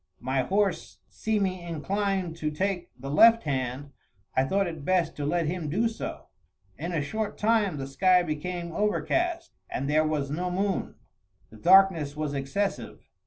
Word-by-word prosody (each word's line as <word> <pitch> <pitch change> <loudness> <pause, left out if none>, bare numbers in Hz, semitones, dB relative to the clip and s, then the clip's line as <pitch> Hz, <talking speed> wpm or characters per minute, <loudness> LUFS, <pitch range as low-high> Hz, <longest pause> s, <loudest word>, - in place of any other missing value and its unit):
My 130 +1 0
horse 195 +4 -1
seeming 200 -4 -1
inclined 185 +2 -2
to 155 -2 -1
take 180 +3 -2
the 135 +2 -6
left 230 +9 +6
hand, 135 -1 -3 0.4
I 130 - +3
thought 195 +8 +1
it 160 -4 -6
best 180 -1 +1
to 145 -1 -2
let 170 +2 +1
him 165 -1 -3
do 210 +10 +1
so. 225 - -6 0.5
In 170 +5 -5
a 160 -4 -1
short 215 +7 -3
time 210 -6 +2
the 135 - -4
sky 180 +6 +3
became 170 +2 -4
overcast, 335 - -1 0.2
and 135 - -3
there 155 +2 +3
was 150 -3 -1
no 180 +4 -2
moon. 195 +1 -1 0.6
The 110 - -13
darkness 175 - +5
was 150 -2 -2
excessive. 140 +9 -3
175 Hz, 160 wpm, -27 LUFS, 145-195 Hz, 0.6 s, left